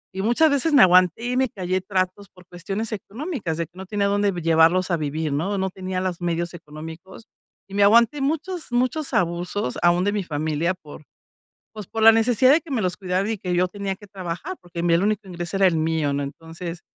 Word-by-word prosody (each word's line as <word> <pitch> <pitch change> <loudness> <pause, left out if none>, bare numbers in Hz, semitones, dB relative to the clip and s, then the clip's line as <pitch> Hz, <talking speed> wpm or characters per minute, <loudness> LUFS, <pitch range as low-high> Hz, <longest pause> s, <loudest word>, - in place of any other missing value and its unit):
y 190 - -2
muchas 240 +9 +3
veces 285 +3 +2
me 285 - +8
aguanté 185 +3 +4
y 250 +1 -1
me 260 -1 +2
callé 185 -2 -2
tratos 190 +1 -2
por 180 0 -19
cuestiones 195 +6 -4
económicas 215 - -4
de 170 - -1
que - - -52
no 190 - -7
tenía 205 0 -1
dónde 205 0 +1
llevarlos 165 +1 +3
a 170 - +2
vivir, 155 0 -2
¿no?, 165 +8 -1
o - - -1
no 190 0 -1
tenía 185 0 -4
las 185 -2 -3
medios 170 0 -2
económicos, 160 +5 -10 0.5
y - - -12
me 205 - +1
aguanté 235 +7 +4
muchos 320 +3 -2
muchos 255 +5 0
abusos, 175 -3 -1
aún 175 +1 +3
de 205 - +1
mi 205 -1 -2
familia 155 +2 -1
por, 155 -3 -13 0.7
pues, 210 -3 -7
por 225 - -4
la 225 - +10
necesidad 230 +3 +4
de 310 - +4
que 325 - -9
me 240 -5 0
los 180 -1 -1
cuidaran 190 +2 -1
y 220 - -2
que 180 -2 -3
yo 180 +1 +2
tenía 200 0 -4
que 205 0 -15
trabajar, 190 - -6
porque 175 -1 -8
en 170 - -1
mí 170 - +4
el 170 - +2
único 210 -1 -1
ingreso 175 +1 -4
era 195 - +5
el 170 - 0
mío, 160 -2 0
¿no? 140 0 -1
Entonces, 165 +4 -8
185 Hz, 225 wpm, -23 LUFS, 170-215 Hz, 0.7 s, la